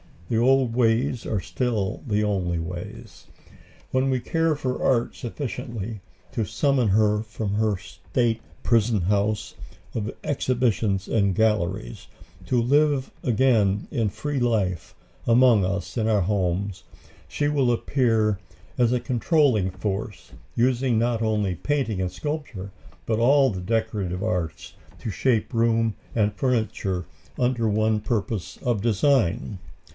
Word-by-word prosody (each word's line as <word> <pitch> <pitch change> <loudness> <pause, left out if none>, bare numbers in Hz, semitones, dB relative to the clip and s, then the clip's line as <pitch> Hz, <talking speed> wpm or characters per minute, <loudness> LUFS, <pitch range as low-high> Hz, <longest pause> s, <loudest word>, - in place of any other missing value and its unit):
The 115 - +1
old 130 0 +3
ways 120 +1 +1
are 105 -4 -1
still 100 +1 -2
the 105 -1 +1
only 95 -5 0
ways. 85 +2 -7 0.6
When 130 +1 +2
we 130 -1 +1
care 165 +1 +1
for 130 -3 -3
art 120 -3 +2
sufficiently 120 -4 -5 0.3
to 115 - -1
summon 125 +3 +1
her 105 +1 +3
from 110 -2 -4
her 110 -1 +2
state 115 +4 -2 0.2
prison 115 -3 +2
house 105 +3 0 0.4
of 110 -1 -2
exhibitions 115 -8 0
and 100 -4 +2
galleries, 95 - 0 0.4
to 125 - +2
live 140 +2 +2
again 110 -5 +2
a 115 -3 0
free 135 +8 -3
life 105 -8 0 0.3
among 120 -4 +5
us 100 +5 -3
in 110 -1 +1
our 105 -3 +3
homes, 95 0 -1 0.4
she 145 0 -1
will 140 -4 +2
appear 115 -5 +1 0.4
as 120 -1 +3
a 125 - +1
controlling 125 - +2
force, 100 +2 -4 0.2
using 125 0 +2
not 115 0 +1
only 105 -4 0
painting 120 - -1
and 90 -1 -1
sculpture, 140 - -5 0.3
but 110 -1 0
all 135 +3 +5
the 95 -2 -5
decorative 95 -3 -1
arts 90 -7 -3 0.3
to 110 - -4
shape 115 +4 0
room 115 -1 +2 0.2
and 105 -2 +2
furniture 110 -7 -1 0.3
under 125 -2 +1
one 110 +1 +2
purpose 105 -3 -3
of 120 -5 0
design. 115 - +1
110 Hz, 130 wpm, -24 LUFS, 100-125 Hz, 0.6 s, among